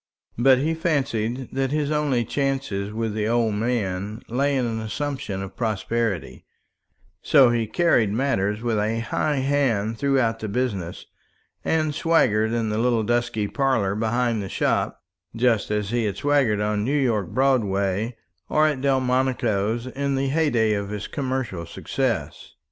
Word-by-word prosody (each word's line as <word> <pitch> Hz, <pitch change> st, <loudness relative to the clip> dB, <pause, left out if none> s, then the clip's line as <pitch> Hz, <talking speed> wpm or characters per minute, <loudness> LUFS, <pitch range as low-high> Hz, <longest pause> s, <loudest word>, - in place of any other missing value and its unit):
But 130 Hz, +1 st, +6 dB
he 155 Hz, +5 st, 0 dB
fancied 135 Hz, -7 st, -1 dB
that 135 Hz, 0 st, -1 dB
his 150 Hz, +1 st, -1 dB
only 145 Hz, -6 st, +1 dB
chance 135 Hz, -1 st, -1 dB
with 105 Hz, +3 st, -2 dB
the 105 Hz, 0 st, -1 dB
old 115 Hz, -1 st, +2 dB
man 105 Hz, -2 st, -2 dB
lay 140 Hz, +4 st, +1 dB
in 125 Hz, -, +1 dB
an 115 Hz, -1 st, -2 dB
assumption 110 Hz, -3 st, -4 dB
of 95 Hz, 0 st, -9 dB
prosperity; 110 Hz, -, -2 dB, 0.8 s
so 135 Hz, -5 st, +5 dB
he 115 Hz, -2 st, 0 dB
carried 120 Hz, -, +2 dB
matters 105 Hz, -3 st, 0 dB
with 115 Hz, -3 st, 0 dB
a 110 Hz, +2 st, 0 dB
high 145 Hz, +6 st, -1 dB
hand 130 Hz, -6 st, 0 dB
throughout 130 Hz, -5 st, +1 dB
the 110 Hz, -, -4 dB
business, 100 Hz, -6 st, -3 dB, 0.6 s
and 155 Hz, -2 st, +1 dB
swaggered 110 Hz, -10 st, +2 dB
in 115 Hz, -2 st, 0 dB
the 105 Hz, +1 st, -1 dB
little 120 Hz, -2 st, +2 dB
dusky 120 Hz, -2 st, 0 dB
parlour 130 Hz, -7 st, +1 dB
behind 115 Hz, +1 st, 0 dB
the 95 Hz, -, -5 dB
shop -, -, -1 dB, 0.3 s
just 115 Hz, -2 st, +2 dB
as 105 Hz, -1 st, -1 dB
he 120 Hz, -2 st, +1 dB
had 100 Hz, -3 st, -2 dB
swaggered 140 Hz, -8 st, +2 dB
on 105 Hz, 0 st, 0 dB
New 140 Hz, +6 st, +1 dB
York 110 Hz, -8 st, 0 dB
Broadway 110 Hz, -4 st, +1 dB, 0.3 s
or 155 Hz, 0 st, +3 dB
at 150 Hz, -4 st, 0 dB
Delmonico's 125 Hz, -5 st, +1 dB
in 140 Hz, +2 st, -2 dB
the 135 Hz, 0 st, 0 dB
heyday 135 Hz, -8 st, +2 dB
of 100 Hz, -1 st, -2 dB
his 105 Hz, 0 st, -4 dB
commercial 130 Hz, -, -3 dB
success. -, -, -3 dB
120 Hz, 150 wpm, -24 LUFS, 105-135 Hz, 0.8 s, But